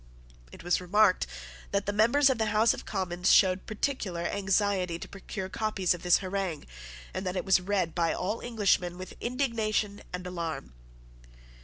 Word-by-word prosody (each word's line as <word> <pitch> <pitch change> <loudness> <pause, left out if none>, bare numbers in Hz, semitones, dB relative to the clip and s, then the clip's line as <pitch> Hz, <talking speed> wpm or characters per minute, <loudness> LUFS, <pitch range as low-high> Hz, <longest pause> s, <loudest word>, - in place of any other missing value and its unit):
It - - -12
was 175 +1 +1
remarked 185 - +3 0.4
that 200 0 -1
the 205 - -1
members 240 +7 +4
of 250 - -2
the 220 - +1
House 215 +2 +4
of - - -9
Commons 180 -2 0
showed 185 -1 +4
particular 215 -6 -2
anxiety 195 -2 0
to - - -8
procure 195 -1 -6
copies 195 -3 0
of 175 - -8
this 180 -1 +5
harangue, 190 -4 -3 0.5
and - - -3
that 185 -1 -3
it 185 - -2
was 190 -1 +4
read 185 -4 0
by 170 -2 +1
all 205 +5 -2
Englishmen 195 -6 +1
with 185 0 -8
indignation 225 -5 -1
and 180 0 -5
alarm. 165 - -5
195 Hz, 165 wpm, -29 LUFS, 180-215 Hz, 0.5 s, this